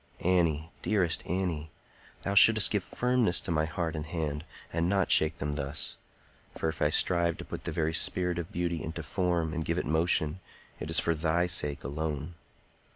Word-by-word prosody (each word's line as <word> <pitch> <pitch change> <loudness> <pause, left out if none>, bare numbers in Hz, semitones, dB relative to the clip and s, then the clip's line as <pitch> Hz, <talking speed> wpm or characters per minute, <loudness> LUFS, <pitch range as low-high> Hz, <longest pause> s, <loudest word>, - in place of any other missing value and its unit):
Annie! 85 -3 +1
dearest 95 -6 0
Annie! 85 -4 -2 0.5
thou 100 - -1
shouldst 105 -3 +8
give - - 0
firmness 125 -7 0
to - - -4
my 80 -1 +1
heart 80 0 -3
and 75 0 -5
hand, 75 -2 -3 0.3
and 85 +1 0
not 95 -2 +1
shake 80 0 +4
them 75 +1 -3
thus; 70 +1 -2 0.6
for 80 - -1
if 80 - -7
I 75 - +3
strive 85 +1 +2
to - - -8
put - - -8
the - - -2
very 80 0 -1
spirit 90 +1 +1
of 85 - -6
beauty 85 -1 -2
into 80 +1 -5
form 85 0 -1
and 80 - -2
give 85 +2 -2
it - - -1
motion, 80 +1 +1 0.4
it 75 - -6
is 80 - +5
for 85 - +1
thy 80 +2 +1
sake 75 -5 0
alone. 75 +3 -4
80 Hz, 185 wpm, -29 LUFS, 80-90 Hz, 0.6 s, shouldst